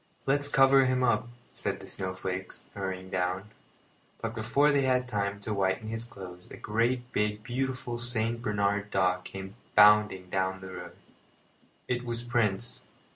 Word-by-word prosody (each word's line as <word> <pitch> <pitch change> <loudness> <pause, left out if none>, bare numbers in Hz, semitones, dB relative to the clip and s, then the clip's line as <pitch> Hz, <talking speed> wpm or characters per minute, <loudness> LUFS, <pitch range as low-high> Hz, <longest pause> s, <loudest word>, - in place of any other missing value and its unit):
"Let's 145 +1 +3
cover 135 -1 +6
him 130 0 +1
up," 120 -1 +2 0.3
said - - -3
the - - -10
snowflakes, 95 0 -4
hurrying 95 -1 -5
down; 95 +3 -1 0.7
but - - -3
before 145 +2 +3
they 140 -1 +3
had 130 -1 +2
time 100 -3 -1
to 105 - -3
whiten 95 +2 0
his 115 +1 -3
clothes 90 -5 -10
a - - -9
great 120 +3 0
big 105 0 0
beautiful 125 -1 -3
Saint 115 -1 0
Bernard 105 -2 0
dog 90 -2 +1
came 95 +1 -8 0.2
bounding 105 -3 +6
down 95 0 0
the 95 0 -8
road. - - -8 0.9
It 125 0 -1
was 120 -1 -3
Prince. 120 -2 -1
105 Hz, 150 wpm, -29 LUFS, 95-120 Hz, 0.9 s, cover